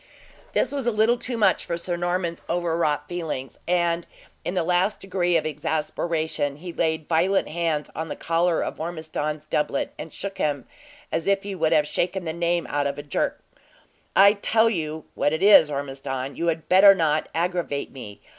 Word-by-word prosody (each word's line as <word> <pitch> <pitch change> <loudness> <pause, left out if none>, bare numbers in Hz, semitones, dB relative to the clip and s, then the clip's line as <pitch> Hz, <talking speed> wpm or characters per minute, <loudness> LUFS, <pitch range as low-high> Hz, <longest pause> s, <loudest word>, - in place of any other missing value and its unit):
This - - +1
was 275 -4 -2
a - - +4
little 220 +2 +3
too 245 -2 -4
much 215 - +3
for 170 - -3
Sir 175 +1 -3
Norman's 175 -1 -2
overwrought 165 -4 0
feelings, 150 -7 -5
and 170 -1 +1 0.4
in 180 - -3
the 180 - +1
last 180 +4 +1
degree 180 -2 +1
of 160 - -2
exasperation, 155 -1 -2
he 175 +3 -8
laid 160 -2 -1
violent 180 +4 +2
hands 160 -2 -1
on 160 0 -4
the - - -4
collar 170 +1 +1
of - - -5
Ormiston's 155 -2 -4
doublet, 150 -2 -1
and 155 +1 -7
shook 195 +4 -6
him 145 -2 -1 0.5
as 160 +2 -2
if 195 0 +2
he 200 0 -5
would 160 -4 0
have 150 - +4
shaken 180 +4 -2
the 160 - -2
name 170 0 0
out 145 -1 0
with 140 - -4
a 145 - -6
jerk. 145 - -2 0.7
"I 200 +1 +8
tell 220 +2 +2
you 155 -5 -3
what 145 - +1
it 160 +4 -1
is, 200 -7 +8
Ormiston, 135 -1 -4
you 170 - -2
had 160 -1 -1
better 195 +2 +8
not 155 -3 +1
aggravate 170 -4 -1
me! 105 -7 -10
170 Hz, 185 wpm, -24 LUFS, 150-180 Hz, 0.7 s, I